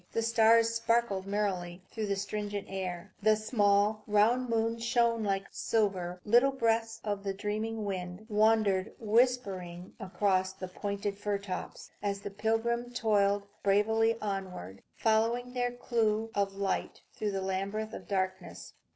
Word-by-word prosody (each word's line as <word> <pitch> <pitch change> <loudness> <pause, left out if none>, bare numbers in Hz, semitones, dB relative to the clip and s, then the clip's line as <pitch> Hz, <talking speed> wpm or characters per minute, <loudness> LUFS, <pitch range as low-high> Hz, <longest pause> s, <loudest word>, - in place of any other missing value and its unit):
The 230 - 0
stars 230 0 +4
sparkled 230 -4 +1
merrily 185 -3 -2
through 220 -2 -3
the 200 - 0
stringent 205 0 -3
air; 180 -3 -5
the 215 +1 +5
small, 210 -1 +2
round 225 +4 +3
moon 230 0 0
shone 235 -1 +2
like 195 -1 0
silver; 185 -5 -1
little 240 +6 +5
breaths 225 -3 0
of 205 -2 -2
the 195 -1 -2
dreaming 215 +2 -3
wind 185 +1 -5
wandered 215 -3 +2
whispering 205 -6 0
across 190 -1 0
the 185 -1 -7
pointed 200 +1 -4
fir 205 -1 -1
tops, 195 -2 -6
as 200 -1 -2
the 205 - -6
pilgrims 235 +3 -1
toiled 205 -3 +2 0.2
bravely 220 +3 +3
onward, 190 - -5
following 230 +3 +1
their 245 -1 0
clue 225 -2 0
of 200 -1 0
light 195 0 -2
through 205 -2 -2
a - - -2
labyrinth 195 +3 -2
of - - -8
darkness. 190 -2 -3
210 Hz, 140 wpm, -31 LUFS, 195-225 Hz, 0.2 s, the